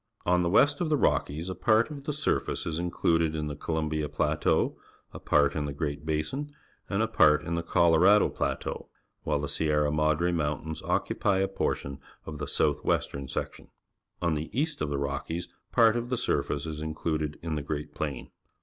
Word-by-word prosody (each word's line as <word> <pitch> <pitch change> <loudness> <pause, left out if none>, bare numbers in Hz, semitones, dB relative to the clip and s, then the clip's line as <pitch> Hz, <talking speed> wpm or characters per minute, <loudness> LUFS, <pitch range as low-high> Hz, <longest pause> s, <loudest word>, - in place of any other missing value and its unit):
On 90 0 +3
the 85 - +1
west 145 - +4
of 170 - 0
the 150 - +3
Rockies 80 - 0
a 95 - -3
part 110 - +2
of 140 -2 -8
the 150 - -1
surface 150 +1 -1
is 80 0 -2
included 80 -2 +1
in 75 -1 -2
the 75 -1 -4
Columbia 80 0 -2
Plateau, - - +1 0.4
a - - -7
part 70 -1 +3
in 75 -2 -1
the 70 - -4
Great 75 0 -4
Basin, 80 - -2 0.4
and 105 +2 +1
a - - +1
part 75 -7 +4
in 85 0 -3
the 85 - 0
Colorado 85 +4 +5
Plateau, - - -3 0.3
while - - 0
the 75 - -3
Sierra 75 -1 +1
Madre 80 +3 +2
Mountains 80 -1 -2
occupy 100 -2 0
a 95 0 +2
portion 70 -7 -2 0.3
of 75 -2 -7
the 75 - -3
south 75 -1 +1
western 70 -1 -1
section. - - -5 0.6
On' 85 -2 +2
the 75 +1 -3
east 150 0 -1
of 75 - 0
the 70 - -1
Rockies 70 +5 -3 0.2
part 115 -2 +5
of 120 0 -2
the 125 - 0
surface 75 -8 -1
is 75 -1 -5
included 80 -1 -2
in 85 -2 -2
the 75 - -1
Great 75 +1 -4
Plain. 75 -4 -4
80 Hz, 190 wpm, -28 LUFS, 75-95 Hz, 0.6 s, Colorado